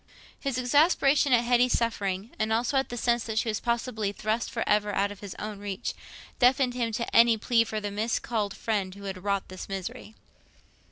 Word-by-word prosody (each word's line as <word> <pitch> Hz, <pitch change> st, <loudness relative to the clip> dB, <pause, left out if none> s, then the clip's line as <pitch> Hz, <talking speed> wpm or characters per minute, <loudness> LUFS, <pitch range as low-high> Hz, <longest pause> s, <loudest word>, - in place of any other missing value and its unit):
His 275 Hz, -3 st, -2 dB
exasperation 280 Hz, +2 st, +3 dB
at 240 Hz, -1 st, +5 dB
Hetty's 245 Hz, +1 st, +3 dB
suffering—and 215 Hz, -1 st, -2 dB
also 235 Hz, +5 st, +1 dB
at 270 Hz, 0 st, +1 dB
the 245 Hz, -, -5 dB
sense 235 Hz, 0 st, +1 dB
that 220 Hz, -1 st, -4 dB
she 225 Hz, -, +1 dB
was 215 Hz, -, -1 dB
possibly 235 Hz, -3 st, -1 dB
thrust 215 Hz, +3 st, -2 dB
for 230 Hz, -, -3 dB
ever 210 Hz, 0 st, +2 dB
out 200 Hz, +1 st, +1 dB
of 205 Hz, -, -10 dB
his 200 Hz, -3 st, -8 dB
own 210 Hz, -1 st, -6 dB
reach—deafened 245 Hz, +5 st, -1 dB
him 235 Hz, -2 st, -1 dB
to 235 Hz, +2 st, -3 dB
any 230 Hz, -1 st, +6 dB
plea 230 Hz, +1 st, +3 dB
for 220 Hz, -1 st, -4 dB
the 205 Hz, -1 st, -4 dB
miscalled 215 Hz, -1 st, -2 dB
friend 200 Hz, -4 st, -2 dB
who 200 Hz, -, -11 dB
had 190 Hz, -2 st, -6 dB
wrought 200 Hz, -1 st, -1 dB
this 185 Hz, +1 st, -8 dB
misery. 215 Hz, +4 st, -6 dB
225 Hz, 185 wpm, -27 LUFS, 205-240 Hz, -, any